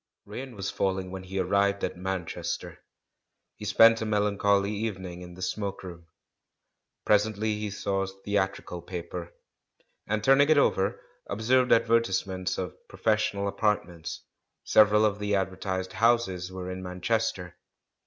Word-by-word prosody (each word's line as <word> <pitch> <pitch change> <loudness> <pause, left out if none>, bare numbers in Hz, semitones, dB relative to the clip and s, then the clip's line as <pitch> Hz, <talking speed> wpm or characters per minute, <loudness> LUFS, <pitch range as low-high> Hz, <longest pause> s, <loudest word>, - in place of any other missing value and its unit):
Rain 125 +4 -7
was 100 0 -3
falling 95 -2 -1
when 95 0 -6
he 95 +1 -7
arrived 100 +1 +1
at - - -1
Man 95 -1 -3
chester. - - -5 0.8
He 105 - -9
spent 115 +2 +6
a - - -1
melancholy 100 -1 +2
evening 95 -5 -4
in 90 0 -10
the 90 - -7
"smoke 100 0 -3
room." 85 -2 -10 1.0
Presently 105 0 +2
he 105 0 -3
saw 100 0 -2
a 95 - -1
theatrical 95 -2 -3
pa 90 0 -5
per, 85 -1 -6 0.8
and 110 0 -1
turning 135 +4 +5
it 155 - +5
over, 95 -8 +2 0.3
observed 125 +5 +2
advertisements 95 -5 +2
of 90 -1 -4
"professional 105 -2 0
apatrments"; 100 -5 -2 0.4
several 105 0 +5
of 105 -1 0
the 105 0 0
ad 95 -1 0
vertised 95 0 -4
houses 105 -6 +1
were 95 0 -5
in 95 0 -6
Manchester. 90 0 -2
100 Hz, 145 wpm, -28 LUFS, 95-105 Hz, 1.0 s, spent